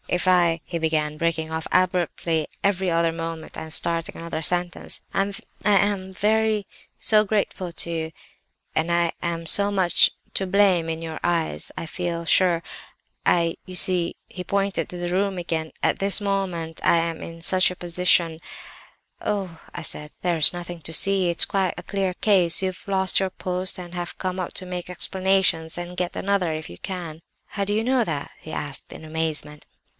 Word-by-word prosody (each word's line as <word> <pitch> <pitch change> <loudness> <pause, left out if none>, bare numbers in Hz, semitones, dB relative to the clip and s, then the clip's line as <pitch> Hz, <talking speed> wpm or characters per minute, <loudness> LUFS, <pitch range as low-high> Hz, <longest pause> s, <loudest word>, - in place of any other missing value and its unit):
"'If 180 +1 0
I—' 175 -2 +4
he 170 - -3
began, 155 -2 0
breaking 160 -1 -1
off 160 0 -3
abruptly 175 -3 +1 0.2
every 190 -2 +1
other 165 0 +2
moment, 165 -1 -6
and 160 - -7
starting 165 +1 0
another 165 -1 -4
sentence. 175 +2 -1
'I—I 200 0 -1 0.3
am 195 -1 +2
so - - -12
very 215 0 +2 0.6
grateful 195 -3 -1
to 170 - 0
you, 160 -1 -3 0.6
and 160 +2 +1
I 170 -1 +2
am 170 -1 -3
so 200 +5 +4
much 185 -4 +5 0.2
to 190 - 0
blame 185 -4 +3
in 160 0 -3
your 160 -1 -5
eyes, 170 -2 -1
I - - -4
feel 170 0 -3
sure, 175 0 +4 0.7
I—you 170 +1 +1
see—' 180 -2 +3
(he 180 - -7
pointed 200 +1 -1
to 180 - -7
the 175 0 -3
room 190 +2 0
again) 165 -2 -3
'at - - +2
this 195 +1 +3
moment 190 -5 -2
I - - +5
am 165 -1 -1
in 165 0 -8
such 185 +2 +4
a - - -6
position—' 170 -2 +2 0.8
"'Oh!' 190 -6 -3
I 170 - -5
said, 150 -1 +1
'there's 170 -4 +5
nothing 175 -1 -7
to 160 +2 -6
see; 190 +2 +3
it's 170 - +5
quite 190 -3 0
a - - -7
clear 195 -2 -2
case—you've 185 -2 +2
lost 190 -1 +3
your 190 - 0
post 185 +1 -1
and 175 -1 -9
have 175 -1 -5
come 185 0 -3
up 180 - -5
to 185 - -2
make 180 -1 -5
explanations 185 -2 +2
and 175 0 -6
get 180 -1 -2
another, 195 -4 +1
if 155 0 -5
you 85 - -11
can!' 170 -4 -6 0.3
"'How 200 - -2
do 200 - -3
you 215 +2 +1
know 255 0 +2
that?' 145 -9 -4
he 155 - -10
asked 145 -3 -4
in 160 - -10
amazement. 155 -2 -3
175 Hz, 175 wpm, -24 LUFS, 165-190 Hz, 0.8 s, much